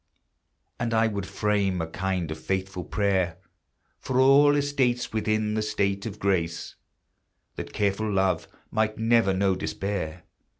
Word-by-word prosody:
And 115 -2 0
I 110 0 +4
would 100 -3 -2
frame 100 -1 0
a 80 - -1
kind 95 -2 -2
of 80 - -5
faithful 95 +1 -3
prayer, 95 -5 0 0.6
For 130 0 -1
all 140 +2 +6
estates 135 -5 0
within 110 -1 0
the 110 - 0
state 100 0 -1
of 105 -2 -7
grace, 85 -5 -1 0.8
That - - -6
careful 105 +1 0
love 95 -3 +1 0.2
might 110 0 0
never 115 -2 +3
know 95 0 +2
despair. 90 -4 -3
100 Hz, 135 wpm, -26 LUFS, 95-110 Hz, 0.8 s, all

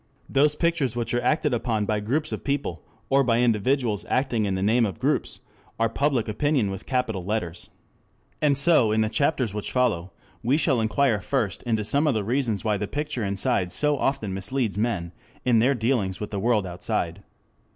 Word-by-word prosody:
Those 145 +2 +3
pictures 165 -8 0
which 120 -1 -2
are 120 - +1
acted 150 -3 +1
upon 115 -3 0
by 105 0 0
groups 135 +9 -1
of - - -5
people, 140 - -2 0.3
or 135 0 +5
by 120 -2 +2
individuals 120 -1 +1
acting 125 -5 +1
in 95 -2 -1
the 95 - -2
name 115 +4 +3
of 100 -6 -2
groups, - - -1 0.4
are 115 0 +2
Public 135 -1 0
Opinion 120 -1 0
with 95 +1 -8
capital 115 -8 -1
letters. 90 -4 -3 0.7
And 145 -2 +3
so 140 -7 +4
in 110 +1 +2
the 110 - +1
chapters 125 -1 0
which 105 -1 -4
follow 95 -8 0 0.3
we 125 +5 +2
shall 135 -7 +2
inquire 110 -1 +1
first 110 -9 -1
into 110 -3 0
some 140 +8 +2
of 140 - +2
the 110 - 0
reasons 115 -2 -1
why 105 -2 +1
the 105 +1 -3
picture 145 -3 -3
inside 95 -2 0
so 150 0 +2
often 135 -8 -1
misleads 105 +2 -2
men 105 -6 -1 0.3
in 120 -3 +4
their 130 +5 +3
dealings 110 -6 0
with 105 - -5
the 100 - -2
world 110 -1 +2
outside. 90 0 -3
115 Hz, 190 wpm, -25 LUFS, 105-135 Hz, 0.7 s, or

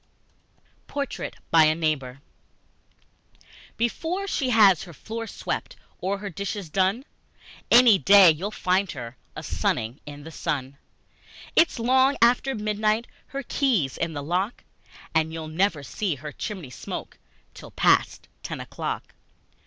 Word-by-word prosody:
Portrait 280 -2 -4 0.2
by 160 -1 +7
a 155 0 +3
Neighbour 140 -5 -2 1.6
BEFORE 325 - -1
she 280 -9 -1
has 205 -7 +6
her 175 - -9
floor 225 +7 -6
swept - - -4 0.2
Or 195 +2 -1
her 200 0 -6
dishes 200 -1 -5
done, 195 - +1 0.6
Any 235 -5 +7
day 195 -3 +8
you'll 175 +7 -3
find 190 -2 0
her 120 -2 -7 0.2
A - - -6
sunning 115 +6 -1
in 145 0 -9
the 160 - -9
sun! 140 -2 -3 0.8
It's 330 - +4
long 260 +4 +3
after 250 +3 +3
midnight, 215 +1 0 0.2
Her 275 0 -5
key's 235 - +1
in 165 -1 -2
the 145 -1 -5
lock, 185 +9 -2 0.5
And 160 0 +2
you'll 160 -1 -6
never 160 -2 0
see 185 +3 -2
her 145 +3 -8
chimney 180 - -6
smoke - - -7 0.3
Till - - -11
past - - +2
ten - - -5
o'clock! - - -5
195 Hz, 135 wpm, -25 LUFS, 155-230 Hz, 1.6 s, day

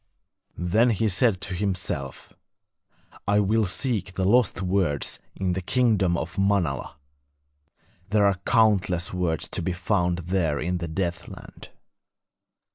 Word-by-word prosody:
Then 105 +8 +2
he 110 0 +1
said 105 0 +2
to 95 - -2
himself: 90 -7 -3 0.9
'I 105 +1 +3
will 110 +2 +2
seek 95 -2 -2
the 95 - 0
lost 105 -2 +3
words 90 -6 0 0.2
in 95 -2 -1
the 95 - -2
kingdom 100 -5 +2
of 85 +4 -5
Manala; 95 -10 0 1.1
there 105 0 +3
are 100 -2 +2
countless 100 -7 +2
words 90 -3 -1
to - - -3
be 90 +2 -1
found 90 -1 0 0.2
there 80 -6 +1
in 90 +4 -2
the 85 - -4
Deathland.' 85 +1 -5
95 Hz, 125 wpm, -25 LUFS, 85-105 Hz, 1.1 s, I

